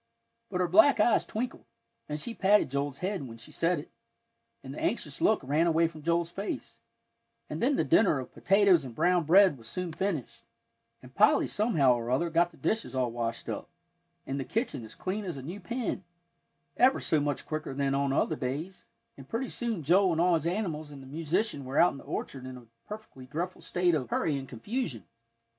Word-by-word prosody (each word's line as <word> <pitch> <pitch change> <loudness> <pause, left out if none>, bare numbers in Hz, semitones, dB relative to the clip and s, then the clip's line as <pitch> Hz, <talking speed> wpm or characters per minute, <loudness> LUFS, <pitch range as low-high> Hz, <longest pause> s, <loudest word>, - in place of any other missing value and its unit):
But 185 -2 -1
her 180 - +2
black 220 +11 +6
eyes 235 - +3
twinkled, 240 +3 -4 0.4
and 150 0 -3
she 230 +9 -3
patted 200 - +3
Joel's 140 0 -2
head 190 +2 -2
when 115 -1 -10
she 115 - -11
said 170 +1 +1
it, 145 - -8 0.7
and - - -7
the - - -7
anxious - - -2
look - - +3
ran 150 +6 +2
away 165 0 +3
from 160 -2 -11
Joel's 170 +1 0
face; 200 +3 -5 0.7
and - - -4
then 270 +4 +3
the - - +2
dinner 205 -9 +4
of 130 - -8
potatoes 195 -4 +4
and 125 -4 -8
brown 180 +2 +2
bread 185 -3 +6
was 115 - -11
soon 180 +7 -3
finished, 175 -7 -3 0.6
and 125 0 -14
Polly 210 +7 +4
somehow 180 - +3
or 120 -1 -3
other 165 +7 +1
got 170 +2 +3
the 165 - -20
dishes 145 - -1
all 125 -2 0
washed 115 -1 -3
up, - - -5 0.6
and 135 +1 -3
the - - -1
kitchen 220 - -2
as 110 - -10
clean 200 +3 -3
as 175 -7 -5
a 135 - -7
new 175 +8 -6
pin, 240 -5 -3 0.7
ever 260 +2 +5
so 155 - +1
much 145 -1 -2
quicker 155 -2 -4
than 140 -1 0
on 140 0 +1
other 155 +3 +1
days, 150 +8 -5 0.3
and 135 -1 -12
pretty 245 +3 -2
soon 230 -9 -2
Joel 180 +4 +4
and 160 - -1
all 175 +1 +4
his 165 -1 +1
animals 170 -5 -2
and 140 -2 -10
the - - -12
musician 160 +3 -1
were 130 +3 -1
out 175 - +6
in 140 - -9
the - - -12
orchard 130 -1 -5
in 130 0 -7
a 125 - -14 0.2
perfectly 210 -12 -9
dreadful 170 +6 -4
state 180 -1 +1
of 130 -6 -1
hurry 150 - 0
and 135 -1 -5
confusion. 125 - -4
165 Hz, 205 wpm, -29 LUFS, 135-195 Hz, 0.7 s, black